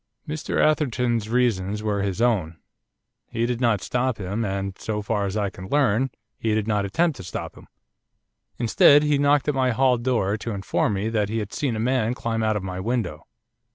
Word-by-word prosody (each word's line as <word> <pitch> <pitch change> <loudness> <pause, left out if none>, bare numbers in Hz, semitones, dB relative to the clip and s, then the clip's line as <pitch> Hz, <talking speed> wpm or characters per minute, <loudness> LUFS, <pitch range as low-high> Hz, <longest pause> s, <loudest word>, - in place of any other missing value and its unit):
'Mr 150 0 -3
Atherton's 125 -7 +1
reasons 105 -4 0
were 105 -2 0
his 100 +3 -1
own. 90 -10 +1 0.7
He 115 - -1
did 120 0 -2
not 115 -4 +2
stop 125 -1 -1
him, 100 +4 -3
and, 100 -1 -3
so 105 -1 -3
far 105 -2 -1
as 95 +2 -3
I 100 -2 -1
can 95 - -9
learn, 135 -1 +2 0.3
he 110 -1 0
did 110 -1 -1
not 105 -2 +1
attempt 160 - +1
to 95 - -8
stop 90 - -6
him. - - -15 0.9
Instead, 140 +5 +5
he 150 -1 +2
knocked 145 0 +3
at 150 - +2
my 130 -1 +1
hall 125 0 +3
door 115 -5 0
to 115 +1 -5
inform 100 +2 0
me 100 +3 -1
that 105 -3 0
he 110 - -2
had 105 -2 -4
seen 135 -6 -1
a - - -3
man 125 0 +1
climb 115 -2 -2
out 110 -1 +1
of 100 - -5
my 90 -1 -5
window. 105 -8 -3
110 Hz, 200 wpm, -24 LUFS, 100-125 Hz, 0.9 s, Instead